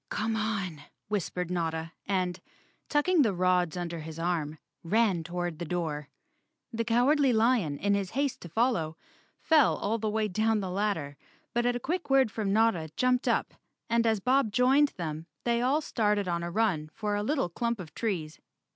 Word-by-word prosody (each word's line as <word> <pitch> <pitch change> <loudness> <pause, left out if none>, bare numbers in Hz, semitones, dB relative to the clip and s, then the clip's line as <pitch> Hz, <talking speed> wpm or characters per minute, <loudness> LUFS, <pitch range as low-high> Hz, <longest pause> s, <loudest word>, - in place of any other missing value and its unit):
"Come 220 +1 -1
on," 200 -8 -2 0.3
whispered 180 -3 -2
Notta 165 -2 -2 0.2
and, 185 -2 0 0.5
tucking 315 +3 +3
the 215 -8 +2
rods 180 -1 +2
under 170 -1 -4
his 160 0 -8
arm, 165 -3 -1 0.3
ran 195 -1 +2
toward 175 -1 -4
the - - -3
door. 155 -4 -3 0.6
The 230 0 -1
Cowardly 255 +4 +3
Lion, 220 - +2
in 200 +5 +1
his 200 -2 0
haste 275 +4 -1
to 175 - -9
follow, 170 -7 0 0.4
fell 310 -5 +4
all 225 +2 -1
the 215 0 -1
way 215 0 0
down 220 +3 +1
the 190 -2 -3
ladder, 180 -8 -2 0.4
but 240 0 +1
at 245 - +1
a - - -2
quick 345 +6 -3
word 270 -4 +4
from 210 -4 -2
Notta 210 -7 +2
jumped 250 0 +2
up, - - +1 0.4
and 230 0 +3
as 220 -2 +2
Bob 255 0 +2
joined 260 +6 +4
them 160 -1 -4 0.2
they 235 0 +1
all 270 +5 +2
started 210 -7 0
on 170 -1 -1
a 170 - -3
run 175 -6 0
for 210 -2 -2
a 205 - 0
little 265 - 0
clump 235 +5 -2
of 165 -4 -9
trees. 170 -9 -3
205 Hz, 180 wpm, -29 LUFS, 170-235 Hz, 0.6 s, fell